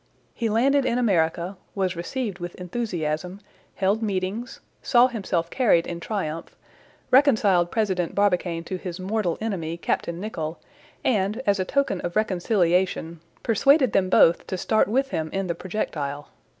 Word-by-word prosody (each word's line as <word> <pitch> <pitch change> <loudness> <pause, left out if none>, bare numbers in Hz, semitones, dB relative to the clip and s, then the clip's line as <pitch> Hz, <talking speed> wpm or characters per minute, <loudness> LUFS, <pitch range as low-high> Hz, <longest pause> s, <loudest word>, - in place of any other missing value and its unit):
He 230 -2 -2
landed 270 +6 +3
in 240 -1 0
America, 180 -4 +1 0.2
was 190 -2 0
received 195 +3 -4
with 175 0 -6
enthusiasm, 180 -3 -3 0.4
held 200 +3 +1
meetings, 205 +3 -3 0.2
saw 245 -1 +5
himself 190 -9 -2
carried 210 -10 +3
in 170 -1 -5
triumph, 165 -4 -4 0.6
reconciled 215 -10 +4
President 190 -6 -1
Barbicane 180 -4 +1
to 185 +2 -4
his 180 0 -6
mortal 190 -2 -1
enemy, 170 -7 -3
Captain 170 0 -2
Nicholl, 165 -6 -4 0.5
and, 210 -2 +1
as 200 -1 +2
a 185 - 0
token 275 -6 0
of 175 - -4
reconciliation, 180 -4 +1 0.2
persuaded 260 +3 +4
them 185 -1 +2
both 170 -2 +4
to 185 - -3
start 215 +4 +2
with 270 +6 0
him 160 -1 -2
in 195 0 -1
the 170 - -1
projectile. 150 -6 -4
190 Hz, 145 wpm, -24 LUFS, 170-220 Hz, 0.6 s, saw